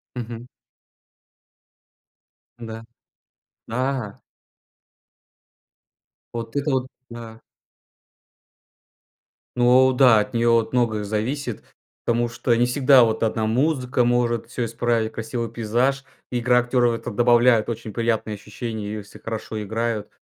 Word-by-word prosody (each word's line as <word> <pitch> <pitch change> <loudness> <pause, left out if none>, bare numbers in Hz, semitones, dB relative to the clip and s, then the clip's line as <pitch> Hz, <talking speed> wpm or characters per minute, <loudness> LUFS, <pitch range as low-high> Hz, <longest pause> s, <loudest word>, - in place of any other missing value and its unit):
Мгм. 120 0 -6 2.1
Да. 115 -1 -8 0.8
Да! 125 -3 -3 2.2
Вот 115 -1 -6
это 145 +1 0
вот, 130 -1 0 0.2
да. 115 -1 -10 2.2
Ну 125 +2 +5
да, 125 -4 +6
от 105 - -3
неё 115 0 +3
вот 115 +1 +1
многое 115 -4 +1
зависит, 115 +4 -3 0.4
потому 120 0 +1
что 120 +1 0
не 120 +1 +3
всегда 130 +1 +5
вот 110 -1 0
одна 110 0 0
музыка 125 +1 +1
может 120 -1 +1
всё 120 0 -3
исправить, 115 -1 -1
красивый 115 +1 -4
пейзаж. 120 +5 0 0.3
Игра 125 0 +3
актеров 120 0 +2
в - - -1
это 120 - -6
добавляет 120 0 +4
очень 115 -1 -5
приятное 115 -1 -1
ощущение, 105 0 -6
если 105 -1 -10
хорошо 110 -1 -5
играют. 110 0 -3
115 Hz, 110 wpm, -23 LUFS, 110-125 Hz, 2.2 s, да